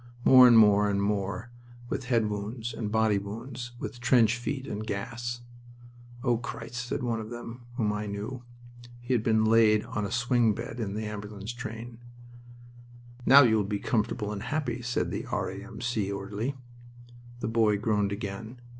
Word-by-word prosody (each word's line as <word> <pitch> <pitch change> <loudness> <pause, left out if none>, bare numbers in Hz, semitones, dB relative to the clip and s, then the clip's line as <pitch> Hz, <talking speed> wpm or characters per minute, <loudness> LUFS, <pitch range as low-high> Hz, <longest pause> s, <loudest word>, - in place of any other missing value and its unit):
More, 130 -1 +9
and 120 -2 +7
more, 105 -1 +6
and 100 -1 0
more, 100 +3 -2 0.4
with 125 - -3
head 115 -4 +2
wounds, 105 +3 -4
and 105 -3 -4
body 110 -2 +3
wounds, 120 +4 -7
with 120 - -6
trench 120 -3 +4
feet, 130 +3 -4
and 105 -3 -4
gas. 120 +4 -4 0.8
"O 120 -3 +2
Christ!" 120 0 -6
said - - -3
one 115 -2 -1
of 110 0 -6
them 120 0 -8
whom 110 -4 0
I 105 0 -3
knew. 105 +5 -5 0.6
He 120 +2 -2
had 120 - +2
been 110 -1 +2
laid 110 -1 +4
on 105 - -3
a 100 - -2
swing 120 -3 +2
bed 120 - -6
in 105 -3 -3
the 110 0 -3
ambulance 105 +1 -6
train. 120 -1 -7 1.3
"Now 140 +2 +9
you 115 -3 +4
will 105 - +2
be 100 +1 -2
comfortable 110 0 -1
and 100 -2 -4
happy," 125 -1 -2
said 125 +1 -1
the - - -4
R.A.M.C. 110 -3 -3
orderly. 100 +7 -3 0.9
The - - -1
boy 110 -2 +3
groaned 105 -2 0
again. 105 +4 -6
110 Hz, 165 wpm, -28 LUFS, 105-120 Hz, 1.3 s, More